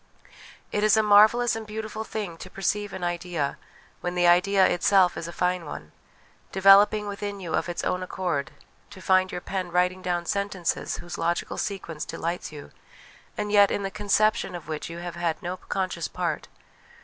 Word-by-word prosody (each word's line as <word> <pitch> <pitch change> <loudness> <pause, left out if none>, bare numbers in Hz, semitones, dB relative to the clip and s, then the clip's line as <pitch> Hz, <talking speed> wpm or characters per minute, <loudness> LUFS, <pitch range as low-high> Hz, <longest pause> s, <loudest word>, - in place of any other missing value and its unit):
It 210 - 0
is 215 +1 +5
a 220 - +4
marvellous 215 +3 +5
and 220 -1 -6
beautiful 215 0 -5
thing 210 -6 -5
to 185 - -9
perceive 205 +2 -2
an 190 -2 -6
idea 175 -4 -2 0.4
when 175 0 -3
the 175 0 +2
idea 190 +3 +5
itself 180 0 +3
is 165 - -5
a - - -6
fine 180 0 0
one 80 - -8 0.6
developing 200 +2 +6
within 205 0 -5
you 175 -4 -5
of - - 0
its 175 - -3
own 180 0 -1
accord, 180 -6 -2 0.4
to 205 - -12
find 185 0 +3
your 180 - -5
pen 185 -2 -4
writing 180 +1 +1
down 175 -1 -1
sentences 200 -2 -2
whose 175 - -8
logical 170 +1 -1
sequence 175 -6 -4
delights 170 0 -4
you, 150 -2 -10 0.7
and 210 -1 -2
yet 205 -1 +6
in 200 - -2
the 195 - -3
conception 210 -2 +1
of 170 -4 -8
which 155 0 -5
you 170 - -7
have 175 0 -6
had 170 -2 -1
no 180 +1 -3
conscious 185 -3 -3
part. 170 -4 -3
185 Hz, 180 wpm, -26 LUFS, 175-205 Hz, 0.7 s, developing